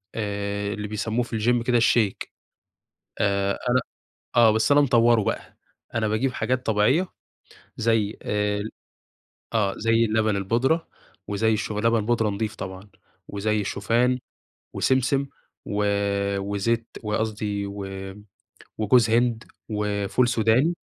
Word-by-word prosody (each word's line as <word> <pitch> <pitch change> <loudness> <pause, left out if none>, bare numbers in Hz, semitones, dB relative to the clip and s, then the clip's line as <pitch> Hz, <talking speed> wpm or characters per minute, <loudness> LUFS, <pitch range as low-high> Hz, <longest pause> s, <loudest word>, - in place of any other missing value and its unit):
آآ 100 -1 -2
اللي 105 0 -5
بيسموه 110 +3 -1
في 115 -2 -4
الGym 120 +2 +2
كده 120 -1 +4
الShake، 115 -3 +2 0.9
آآ 100 -1 +1 0.2
أنا 130 +1 +3 0.5
آه، 115 -2 +7
بس 110 +6 +1
أنا 145 0 +6
مطوّره 120 -4 +4
بقى، - - -4 0.4
أنا 110 -1 +1
باجيب 120 +5 0
حاجات 125 +3 -1
طبيعية 115 - +2 0.7
زي 110 -2 +1
آآ، 105 0 -1 0.9
آه 105 -3 +2
زي 115 +1 +3
اللبن 110 -1 +1
البودرة، 120 - +1 0.4
وزي 110 +2 +1
الش 110 - -2
لبن 110 +1 +1
بودرة 115 -2 +1
نضيف 105 +2 -3
طبعًا، 95 +1 -8 0.4
وزي 105 +1 -1
الشوفان، 120 +6 +1 0.6
وسمسم، 130 +1 +1 0.4
و 105 0 -1 0.5
وزيت 100 +4 -1 0.2
وقصدي 105 -2 -2
و 100 0 -6 0.9
وجوز 110 +2 +4
هند، 120 0 +2 0.2
وفول 105 +3 0
سوداني، 120 +8 +3
110 Hz, 120 wpm, -24 LUFS, 105-120 Hz, 0.9 s, آه